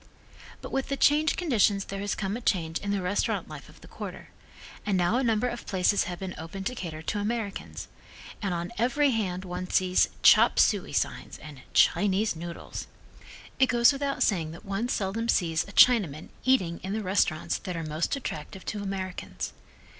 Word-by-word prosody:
But - - -7
with 270 0 -1
the 275 - -1
changed 300 +3 +3
conditions 215 - +2
there 195 - -6
has 200 0 -2
come 195 0 -2
a 240 - -5
change 165 -7 0
in 200 - -5
the 200 -2 0
restaurant 190 +3 0
life - - -10
of - - -18
the - - -14
quarter, - - -8 0.5
and 200 -3 +1
now 180 +6 +2
a 265 - +1
number 230 0 +2
of 240 -1 -6
places 190 +1 +2
have 175 0 -5
been 190 0 -5
opened 180 +4 -7
to 250 - -1
cater 160 -9 -6
to 205 - -2
Americans, 210 -1 -4 0.5
and 200 -3 -1
on 175 +2 -3
every 270 +4 +3
hand 190 -5 -2
one 180 0 -5
sees 185 -1 +3
"chop - - +7
suey" - - +3
signs, - - -2
and 150 -3 -11
"Chinese 205 0 +3
noodles." 170 +1 -7 0.7
It 265 - +5
goes 240 +3 +5
without 275 0 -1
saying 170 -6 +1
that 165 - -12
one 200 +5 -2
seldom 220 +3 -1
sees 165 -6 +1
a - - -10
Chinaman 195 - +4
eating 185 -11 +2
in 190 +1 -4
the 220 0 -2
restaurants 185 -5 0
that 180 -3 -5
are 165 - -3
most 155 - -1
attractive 210 -7 -6
to 210 - -3
Americans. 190 -2 -5
195 Hz, 185 wpm, -27 LUFS, 180-230 Hz, 0.7 s, chop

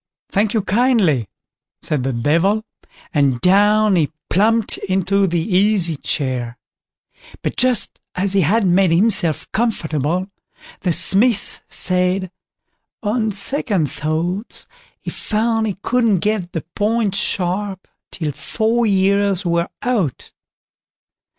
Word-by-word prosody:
"Thank 210 +2 0
you 215 - +1
kindly", 200 - +2 0.6
said 150 -4 -1
the 135 +2 -1
Devil, 165 - +1 0.5
and 140 -4 +2
down 205 - +4
he 160 -4 +1 0.2
plumped 220 +4 +2
into 190 +1 0
the 170 -1 0
easy 185 -1 +1
chair; 130 -4 -3 0.9
but - - -2
just 250 -3 +1 0.2
as 190 +1 0
he 195 - +3
had 200 +7 +2
made 185 +1 +3
himself 170 - +2
comfortable, 175 - -1 0.5
the 180 - -1
Smith 205 +6 +2
said, 185 0 +1 0.7
on 220 +1 0
second 200 - +1
thoughts, 170 +8 -3 0.3
he - - -6
found 225 +1 -1
he 200 - -4
couldn't 230 -7 +1
get 210 -4 -1
the 165 - -4
point 215 -1 0
sharp 195 -1 -2 0.2
till 155 -4 -3
four 220 - -1
years 200 -1 +1
were 170 0 0
out. 215 - -2
195 Hz, 115 wpm, -19 LUFS, 170-215 Hz, 0.9 s, down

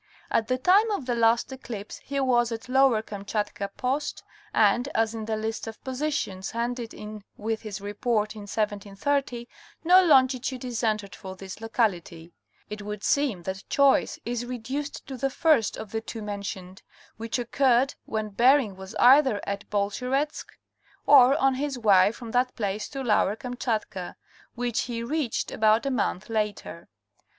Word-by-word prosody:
At 220 - +1
the 255 - +1
time 385 - +4
of 400 -11 -2
the 245 - 0
last 235 +2 +2
eclipse 235 -6 -7
he 280 0 -4
was 240 -3 +2
at 225 +1 -5
Lower 255 -4 +4
Kamchatka 205 -1 -3
post, 270 +4 -2 0.3
and 245 +2 +3
as, 225 0 +1
in 220 -1 -5
the 220 0 -1
list 220 +1 -4
of 220 - -9
positions 260 -8 -3
handed 235 0 -3
in 210 -1 -9
with 220 +1 -3
his 210 -2 -6
Report 210 +1 -1
in 210 -2 -9
1730, 220 +5 -2 0.4
no 365 +3 +7
longitude 260 -4 +3
is 245 -2 -3
entered 215 -3 -1
for 190 0 -8
this 190 +2 -9
locality, 175 -7 -2 0.3
it 210 0 -7
would 210 0 -6
seem 265 -11 +1
that 190 +2 -5
choice 280 -1 +3
is 240 0 -2
reduced 255 +4 -5
to 265 - -7
the 270 +2 0
first 295 -5 +2
of 215 - -8
the 225 - -2
two 225 -1 -7
mentioned; 200 -2 -6 0.4
which 230 +2 -3
occurred 255 +2 +2
when 215 -1 -3
Bering 240 0 +3
was 190 +3 -10
either 260 -3 +6
at 200 +1 -5
Bolsheretsk 250 +9 -1 0.6
or 275 -2 +7
on 270 -3 +3
his 275 0 -2
way 200 -4 +5
from 230 0 -9
that 250 +1 +1
place 205 -1 -3
to 270 -1 -5
Lower 210 -3 +2
Kamchatka, 220 -6 -4 0.4
which 240 -1 -1
he 230 -1 -3
reached 275 -1 -2
about 220 +3 +3
a 275 - 0
month 210 -6 -1
later. 210 -6 -3
230 Hz, 160 wpm, -26 LUFS, 210-260 Hz, 0.6 s, no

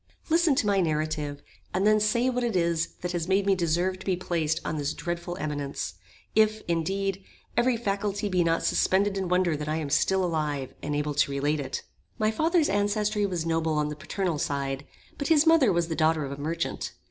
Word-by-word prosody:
Listen 330 -3 +4
to 260 - +1
my 200 -2 +3
narrative, 155 -3 -2 0.3
and 190 +2 +2
then 215 0 +5
say 225 +4 +2
what 250 -1 0
it 235 -4 -1
is 170 -2 +1
that 180 - -2
has 170 -2 -2
made 195 +1 +2
me 200 - +4
deserve 180 +1 0
to - - -11
be 190 - +2
placed 165 -3 -1
on 155 - -2
this 145 +1 -2
dreadful 175 +1 -4
eminence, 145 - -3 0.4
if, 215 0 +3
indeed, 195 +3 -1 0.3
every 240 0 +3
faculty 205 -1 -1
be 185 -3 +2
not 165 0 +1
suspended 195 +1 +2
in 190 -2 -2
wonder 180 -2 +2
that 150 0 -4
I 155 - 0
am 150 -3 -3
still 190 +5 +2
alive, 150 -5 -2
and 145 0 -2
am - - +1
able 150 0 -1
to 145 0 +2
relate 145 +2 0
it. 135 -2 -4 0.3
My 215 0 +2
father's 320 +7 +2
ancestry 205 +1 +1
was 175 -4 -2
noble 165 -1 0
on 150 -1 0
the 150 - -5
paternal 170 +1 -2
side; 140 -1 -2 0.3
but 280 - -1
his 320 -1 +5
mother 320 -9 +5
was 170 -2 +1
the 165 - -3
daughter 155 -1 +2
of 135 - -6
a 140 +1 -6
merchant. 160 +3 -3
175 Hz, 210 wpm, -27 LUFS, 155-205 Hz, 0.4 s, then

